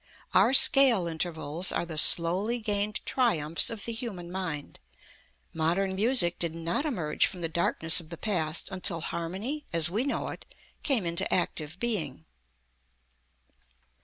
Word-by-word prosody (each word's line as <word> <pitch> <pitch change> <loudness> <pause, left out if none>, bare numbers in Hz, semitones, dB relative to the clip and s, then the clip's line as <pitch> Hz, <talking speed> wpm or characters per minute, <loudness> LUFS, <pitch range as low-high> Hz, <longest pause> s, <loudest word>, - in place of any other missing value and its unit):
Our 265 - +4
scale 255 -9 +7
intervals 165 0 0
are - - -2
the 165 -2 -8
slowly 180 +9 +3
gained 210 -2 -2
triumphs 165 - +1
of 225 -3 -6
the 235 - -2
human 195 -7 -7
mind. 165 -6 -6 0.7
Modern 175 +5 -1
music 195 -3 +2
did 165 -2 -1
not 165 - -3
emerge 165 - 0
from 180 -3 -8
the 165 - -1
darkness 165 +1 +1
of 160 -3 -12
the 170 - -8
past 170 -4 -1
until 185 -3 -1
harmony, 190 - -5
as 165 0 0
we 215 +6 -1
know 280 - -3
it, - - -9 0.4
came 255 - +1
into 170 0 -1
active 170 -1 -2
being. 160 - -3
175 Hz, 140 wpm, -27 LUFS, 165-215 Hz, 0.7 s, scale